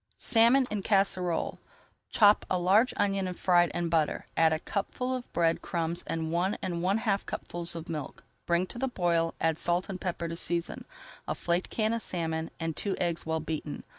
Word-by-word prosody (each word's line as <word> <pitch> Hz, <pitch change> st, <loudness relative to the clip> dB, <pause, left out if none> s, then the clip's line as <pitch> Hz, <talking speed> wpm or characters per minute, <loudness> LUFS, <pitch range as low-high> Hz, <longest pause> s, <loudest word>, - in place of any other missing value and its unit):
SALMON 245 Hz, +3 st, +4 dB
EN 210 Hz, -1 st, -1 dB
CASSEROLE 185 Hz, -4 st, 0 dB, 0.5 s
Chop 205 Hz, -1 st, +5 dB
a 185 Hz, -, +2 dB
large 195 Hz, +7 st, +4 dB
onion 195 Hz, -2 st, +1 dB
and 180 Hz, -, -5 dB
fry 175 Hz, -1 st, +4 dB
it -, -, -6 dB
in 175 Hz, -1 st, -1 dB
butter. 165 Hz, -2 st, 0 dB
Add 160 Hz, -1 st, +4 dB
a 160 Hz, -, +2 dB
cupful 250 Hz, +9 st, -3 dB
of 255 Hz, -1 st, -5 dB
bread 165 Hz, -1 st, +1 dB
crumbs 170 Hz, 0 st, -2 dB
and 160 Hz, -1 st, -2 dB
one 180 Hz, +4 st, 0 dB
and 170 Hz, -2 st, -3 dB
one 190 Hz, +4 st, +2 dB
half 210 Hz, -4 st, 0 dB
cupfuls 170 Hz, 0 st, -3 dB
of 165 Hz, -1 st, -6 dB
milk. 150 Hz, -4 st, -6 dB, 0.2 s
Bring 170 Hz, +1 st, +2 dB
to 235 Hz, -, -9 dB
the 265 Hz, -, 0 dB
boil, 170 Hz, -7 st, +1 dB
[Page -, -, -37 dB
304] 165 Hz, -, +4 dB
add 160 Hz, -, -2 dB
salt 175 Hz, +2 st, 0 dB
and 185 Hz, -2 st, -5 dB
pepper 170 Hz, -2 st, -2 dB
to 165 Hz, -, -4 dB
season, 170 Hz, 0 st, -3 dB, 0.4 s
a -, -, -1 dB
flaked 175 Hz, +1 st, -1 dB
can 220 Hz, 0 st, 0 dB
of 230 Hz, -, -1 dB
salmon, 165 Hz, -4 st, -2 dB
and 165 Hz, -1 st, -2 dB
two 200 Hz, -2 st, -1 dB
eggs 170 Hz, -2 st, -1 dB
well 160 Hz, 0 st, 0 dB
beaten. 155 Hz, -1 st, -5 dB
175 Hz, 205 wpm, -29 LUFS, 165-200 Hz, 0.5 s, Chop